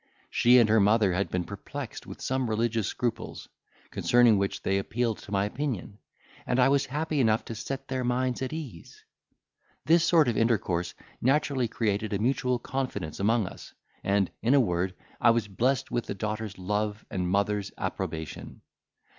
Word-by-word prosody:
She 125 +1 +5
and 120 -3 +6
her 110 +1 +4
mother 105 -1 +4
had 100 +3 0
been 90 -1 -1
perplexed 110 +6 -7
with - - -9
some 130 -2 0
religious 110 -1 0
scruples, 120 -2 -3 0.4
concerning 120 -4 +4
which 100 0 -2
they 95 0 +1
appealed 115 +2 -1
to 100 - -12
my 100 0 +2
opinion; 110 -4 -4 0.5
and 125 - +1
I 125 - +5
was 140 0 +2
happy 150 +2 -1
enough 110 -3 +2
to - - -5
set 135 +4 -5
their 130 -1 -2
minds 125 +1 0
at 130 - -2
ease. 145 - -8 0.8
"This 165 +2 +5
sort 165 -4 +4
of 120 - +1
intercourse 95 -7 0 0.3
naturally 135 -1 +2
created 110 -1 -1
a - - +1
mutual 125 +3 +1
confidence 125 - -4
among 110 +2 +2
us; - - -10 0.3
and, 100 -2 +1
in 120 +5 +3
a - - +6
word, 90 -4 0 0.3
I 120 - +6
was 115 -2 +2
blessed 125 +6 0
with 120 - -1
the - - -3
daughter's 105 0 -4
love 105 +3 -2
and 90 -2 -1
mother's 100 +1 0
approbation. 80 -1 -5
115 Hz, 170 wpm, -28 LUFS, 100-130 Hz, 0.8 s, and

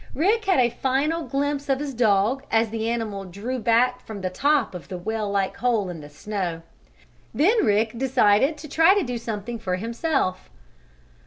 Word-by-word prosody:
Rick 425 - +2
had 380 - +3
a 240 -2 +3
final 275 +7 0
glimpse 285 +1 -2
of 270 - +3
his 285 -2 -4
dog 225 +2 +2
as 225 -1 +2
the 225 0 -2
animal 220 -4 -3
drew 205 +8 -5
back 245 +2 +2
from 210 -3 -8
the 185 -1 -2
top 285 +7 +1
of 180 - -8
the 185 - -6
well 215 +3 -3
like 195 -1 -1
hole 230 -6 0
in 170 -3 -7
the 145 - -11
snow. 175 +1 -4 0.7
Then 410 +10 +3
Rick 215 +1 +2
decided 265 +2 +3
to 305 - -9
try 325 +6 +5
to 405 - +2
do 245 -4 -4
something 225 0 -5
for 185 -3 -2
himself. 230 - -2
230 Hz, 180 wpm, -24 LUFS, 200-275 Hz, 0.7 s, try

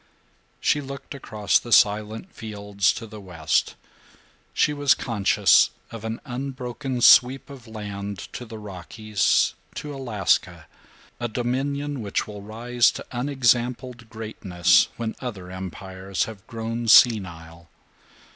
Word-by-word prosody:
She 150 - +1
looked 140 +1 -8
across 110 -6 0
the 120 - -10
silent 110 - +3
fields 105 -3 -1
to 115 - -7
the 105 -1 -10
west. 85 -5 -1 0.8
She 150 - +2
was 145 -1 +3
conscious 110 -5 +3 0.2
of 115 -2 -8
an 110 0 -4
unbroken 130 0 -4
sweep 130 +4 +6
of 130 -4 -12
land 100 -2 -6 0.2
to - - -6
the 110 -1 -9
Rockies, 105 +1 0 0.2
to 150 -1 -6
Alaska, 95 - 0 0.5
a 120 - -1
dominion 135 +4 -2
which 100 -2 -2
will 105 -1 -9
rise 120 +3 +1
to - - -7
unexampled 125 -2 0
greatness 105 -6 +2
when 115 -1 -3
other 100 -8 -7
empires 95 +1 -4
have 105 -3 -9
grown 115 0 -4
senile. 85 -8 +4
110 Hz, 120 wpm, -24 LUFS, 100-125 Hz, 0.8 s, sweep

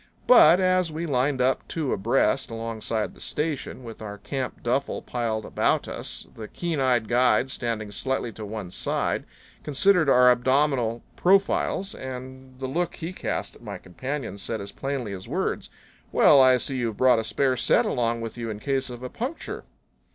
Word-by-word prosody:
But 190 -7 +8
as 185 -2 +2
we 160 +2 -4
lined 135 -2 +1
up 130 +1 +1
two 155 -5 -2
abreast 125 +5 +1
alongside 115 -1 -3
the - - -16
station, 150 -4 -3
with 115 -2 -9
our 105 -1 -6
camp 130 +3 -5
duffel 130 +4 -1
piled 115 -3 -2
about - - +1
us, - - -6
the 110 -1 -8
keen 170 +2 -3
eyed 125 -4 +2
guide, 125 +1 +3
standing 115 -5 -3
slightly 125 +3 -2
to 110 +1 -9
one 105 -3 -6
side, - - -1 0.4
considered 160 +2 +3
our 125 -1 +7
abdominal 125 -2 +1
profiles, 195 +1 +2
and 130 0 -9
the 135 - -4
look 165 +6 -2
he 165 +3 -6
cast - - -3
at - - -17
my - - -6
companion 120 +2 -5
said 110 +3 -4
as 100 0 -7
plainly 135 -7 -4
as 95 -1 -8
words, - - -2 0.4
"Well, 140 - +6
I 130 -1 +6
see 130 +2 -2
you've 115 -4 -2
brought 125 -2 +5
a - - -2
spare 130 +3 +1
set 120 -1 +3
along 115 -1 0
with 115 +1 -6
you 115 -1 -3
in 105 - -4
case 135 +2 -1
of 120 0 -8
a 125 - -4
puncture." 260 - -5
130 Hz, 175 wpm, -25 LUFS, 115-140 Hz, 0.4 s, But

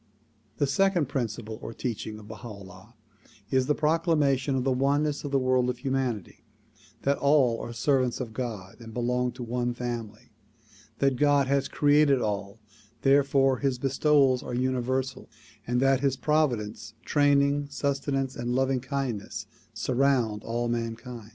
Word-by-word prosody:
The 145 - +2
second 175 0 +2
principle 115 -5 -3
or 115 - -6
teaching 110 -3 -4
of 105 -1 -12
Baha 110 +2 -9
'Ullah 100 +1 -12 0.6
is 130 -1 +2
the 150 - +2
procla 165 +2 +2
mation 135 -1 +1
of 130 - 0
the 135 - +1
oneness 145 +3 +1
of 145 - -3
the 140 - +2
world 130 -1 +2
of 125 - -2
humanity; 130 - -3 0.6
that 140 +1 +1
all 140 -5 +3
are 120 - -6
servants 125 +1 +1
of 120 -4 -5
God 110 -6 -5
and 115 -1 -11
belong 125 +1 0
to 125 - -7
one 120 +1 -2
family; 115 -3 -6 0.7
that 135 -2 +2
God 145 0 +4
has 140 +1 +1
created 145 -2 +4
all 100 -2 -3 0.5
therefore 135 -1 +4
his 135 -3 0
bestowals 135 0 +3
are 125 - -5
universal; 130 +1 -1 0.4
and 125 +1 +1
that 135 -1 +4
his 135 -1 0
providence, 115 -8 -1
training, 145 0 +3
sustenance 135 -2 -1
and 120 +1 -2
loving 135 0 +1
kindness 120 -5 -4 0.3
surround 120 -2 +1
all 120 +1 -2
mankind. 120 -1 -4
130 Hz, 150 wpm, -27 LUFS, 120-140 Hz, 0.7 s, God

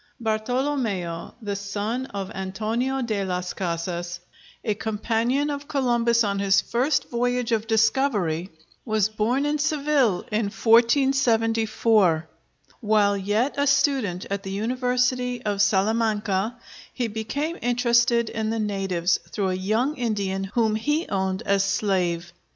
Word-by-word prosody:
Bartolomeo, 220 -6 -2
the 205 -1 -2
son 205 +6 -3
of 200 -3 -5
Antonio 225 +8 -2
de 215 -4 -1
las 180 -1 -3
Casas, 175 0 -3 0.4
a 215 - 0
companion 230 +6 -1
of 285 0 -5
Columbus 235 -4 +2
on 200 -1 -1
his 195 -1 +4
first 270 +4 0
voyage 245 0 0
of 225 -1 0
discovery, 220 - +1 0.3
was 215 -3 +1
born 225 +6 0
in 295 +1 0
Seville 285 - +2
in 215 +1 +1
1474. 225 - +3 0.5
While 210 -2 +3
yet 205 +7 0
a 285 - +2
student 265 -10 +1
at 200 0 -1
the 195 - -7
University 250 +3 0
of 205 -1 0
Salamanca 210 +1 +1 0.3
he 245 -2 -2
became 280 +10 -3
interested 235 -1 +2
in 220 0 -2
the 225 - -1
natives, 195 -5 0
through 195 -3 -1
a - - 0
young 215 +10 0
Indian 200 -5 -1
whom 220 +2 +1
he 295 +9 0
owned 190 +1 -1
as 200 -1 +2
slave. 180 -4 -1
220 Hz, 130 wpm, -24 LUFS, 195-245 Hz, 0.5 s, his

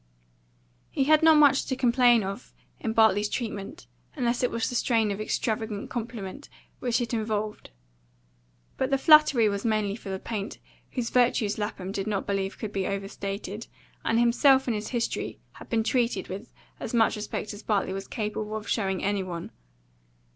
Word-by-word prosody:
He - - 0
had 310 +2 +5
not 320 -1 +7
much 285 -2 +5
to 260 - -1
complain 245 -2 +4
of 195 +5 -7 0.2
in 225 - -2
Bartley's 220 -2 +4
treatment, 220 - -5 0.3
unless 245 -4 0
it 250 - +2
was 230 -1 -1
the - - -4
strain 225 -3 +2
of 200 +1 -3
extravagant 215 -1 -2
compliment 235 +1 -6 0.3
which 245 -1 0
it 240 0 -3
involved. 215 -1 -2 1.1
But 265 - 0
the 275 - +3
flattery 285 -5 +6
was 200 -1 -2
mainly 215 -3 0
for 215 -3 -9
the 190 - -2
paint, 210 0 -5 0.4
whose 245 -3 -2
virtues 235 -4 +2
Lapham 200 -3 -4
did 195 0 -3
not 205 -2 -1
believe 195 -1 -2
could 215 -1 -5
be 195 -1 -1
overstated, 200 +1 -5 0.4
and 225 - +1
himself 265 +3 +5
and 240 - 0
his 210 0 -3
history 240 -2 -2
had - - -13
been 225 -1 +1
treated 240 +1 0
with 200 +5 -7 0.3
as 235 - -4
much 225 -1 +4
respect 210 0 -4
as 205 - -9
Bartley 200 -3 0
was 195 0 -5
capable 215 -1 -3
of 220 0 -5
showing 190 -4 -1
any 200 0 +1
one. 175 -3 -6
220 Hz, 170 wpm, -27 LUFS, 200-240 Hz, 1.1 s, not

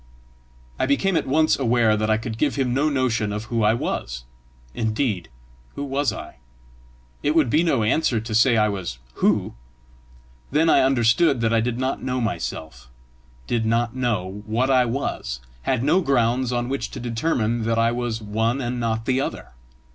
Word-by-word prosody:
I - - +1
became 180 +7 +1
at - - 0
once 155 +3 +3
aware 120 -4 +3
that 110 0 -1
I 110 - +3
could 110 0 -6
give 145 -2 +1
him 130 -3 0
no 145 +4 +2
notion 125 -6 0
of 105 +1 -3
who 115 0 -1
I 105 +1 +4
was. - - -3 0.5
Indeed, 110 - -1 0.5
who 140 - -4
was 140 0 0
I? - - -9 0.8
It 150 +2 0
would 150 -8 +3
be 155 - +4
no 140 -10 +1
answer 120 +1 +2
to 110 +1 -6
say 115 +2 +4
I 105 -1 +4
was 95 - -4 0.2
who! - - +2 1.0
Then 160 +3 +3
I - - +5
understood 130 +3 +3
that 115 0 +1
I 115 - +3
did 120 +1 -2
not 130 +1 -2
know 130 0 -2
myself, 85 - -4 0.6
did 115 - 0
not 115 +2 0
know 105 -6 -2
what 120 +5 +1
I 130 -1 +4
was, 115 - -3 0.3
had 130 -2 +1
no 165 +7 +3
grounds 125 -3 +1
on 120 0 -1
which 135 +1 -3
to - - -8
determine 120 -1 -1
that 115 0 0
I 115 0 +3
was 120 -2 -3
one 110 +5 0
and 125 -1 -3
not 115 -1 -2
another. 130 +1 -2
120 Hz, 180 wpm, -23 LUFS, 110-135 Hz, 1.0 s, I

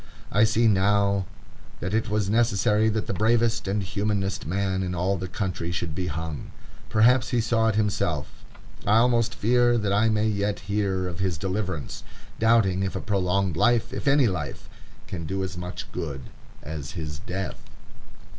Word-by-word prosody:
I 105 +2 +5
see 115 +1 +3
now 100 -1 +2 0.5
that 90 +3 -3
it 110 +1 0
was 105 -2 0
necessary 110 -1 +3
that 110 0 -1
the - - -3
bravest 110 +1 +2
and 100 +1 0
humanest 100 0 -2
man 95 +1 0
in 90 -1 -2
all 90 +3 +1
the 95 0 -4
country 90 -5 -3
should 85 -2 -3
be 90 +2 -3
hung. 80 -2 -5 0.4
Perhaps 120 +4 +4
he 125 -2 +1
saw 115 0 +2
it 110 - +1
himself. 95 -8 0 0.6
I 105 +2 +5
almost 115 -1 +3
fear 120 +2 +3
that 105 -3 0
I 105 +3 +3
may 110 0 +1
yet 100 -1 -1
hear 95 -2 -1
of 90 -1 -6
his 95 -3 0
deliverance, 95 -3 -3 0.4
doubting 110 -5 +3
if 95 -1 -2
a - - -1
prolonged 95 -2 0
life, 120 -2 +2
if - - -4
any 140 -1 +5
life, 95 -4 -4 0.4
can 85 -3 -6
do 95 0 -2
as 95 - -4
much 90 +1 -6
good 70 -5 -4 0.4
as 75 -1 -6
his 75 -4 -5
death. 95 +4 -5
100 Hz, 170 wpm, -25 LUFS, 90-110 Hz, 0.6 s, I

